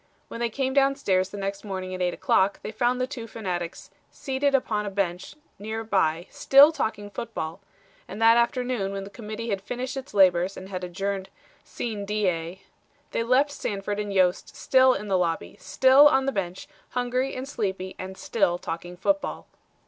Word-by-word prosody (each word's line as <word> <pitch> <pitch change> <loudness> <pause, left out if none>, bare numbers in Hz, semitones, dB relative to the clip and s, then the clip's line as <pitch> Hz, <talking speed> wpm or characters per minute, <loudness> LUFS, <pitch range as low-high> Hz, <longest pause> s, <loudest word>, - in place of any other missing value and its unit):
When - - -7
they 235 0 0
came 265 +3 -2
down 275 0 +4
stairs 190 -8 +1
the 205 - -8
next 195 0 -4
morning 190 -2 -5
at 185 - -5
eight 180 -1 0
o'clock 195 +1 +2
they 210 - -5
found 245 +3 0
the 255 - +1
two 255 -4 -7
fanatics 180 -5 -5 0.2
seated 275 +1 0
upon 210 -5 0
a - - -1
bench 190 +2 -3 0.2
nearby 205 -6 -1
still 280 +3 +7
talking 205 -8 -3
football, 200 -6 -5 0.5
and 200 - -8
that 225 0 +6
afternoon 235 -4 0
when 195 0 -4
the 195 - -10
Committee 220 +1 -6
had 200 -2 -1
finished 250 +6 -4
its 270 -5 -7
labors 185 -1 +4
and 190 - -9
had 185 -2 -5
adjourned 195 +2 -3 0.3
sine 215 -4 -5
die 185 -4 -1 0.5
they - - -1
left 255 +5 +3
Sanford 205 -5 -3
and 205 -1 -3
Yost 185 -2 +1
still 260 -1 +4
in 210 +2 -5
the 190 -2 +2
lobby, 165 -2 -2
still 260 +9 +6
on 265 -2 +3
the 270 - +1
bench, 185 -5 -4 0.3
hungry 250 +2 -1
and 255 +1 -5
sleepy 190 -7 -3
and 190 0 -7
still 195 -6 +1
talking 175 +1 -6
football." 295 +10 -1
205 Hz, 180 wpm, -26 LUFS, 190-250 Hz, 0.5 s, still